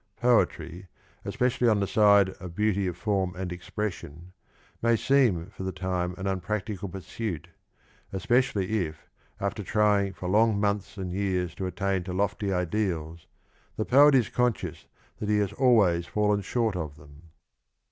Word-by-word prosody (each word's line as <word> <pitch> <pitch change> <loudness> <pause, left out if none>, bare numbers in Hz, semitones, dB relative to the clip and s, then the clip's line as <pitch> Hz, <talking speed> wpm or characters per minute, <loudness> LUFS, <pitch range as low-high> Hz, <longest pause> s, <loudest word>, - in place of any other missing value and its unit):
Poetry, 110 -6 +1 0.4
especially 125 0 +1
on 110 -3 +3
the 100 - +1
side 100 -1 +5
of 90 -2 -9
beauty 100 -2 +1
of 90 -2 -4
form 95 -2 -1
and 90 -1 -4
expression, 90 -2 -6 0.5
may 115 0 +3
seem 115 -10 +2
for - - -8
the 95 0 -2
time 90 -1 -2
an 95 - -5
unpractical 100 +1 -3
pursuit, 90 -2 -5 0.6
especially 105 -2 +1
if, 80 0 -13 0.3
after - - -2
trying 105 -2 +2
for 90 - -6
long 105 +2 +3
months 100 -1 -1
and 95 -2 -4
years 90 -3 -1
to 95 - -4
attain 95 +1 -1
to 90 - -5
lofty 100 +1 -1
ideals, 85 -3 -2 0.5
the 110 - -1
poet 145 +2 +6
is 125 -4 +3
conscious 125 -3 -1 0.3
that 105 - -3
he 105 - +3
has 100 -2 0
always 100 -10 +3
fallen 105 -1 +1
short 110 +1 -1
of 80 -5 -4
them. 75 +2 -17
100 Hz, 150 wpm, -27 LUFS, 90-105 Hz, 0.6 s, poet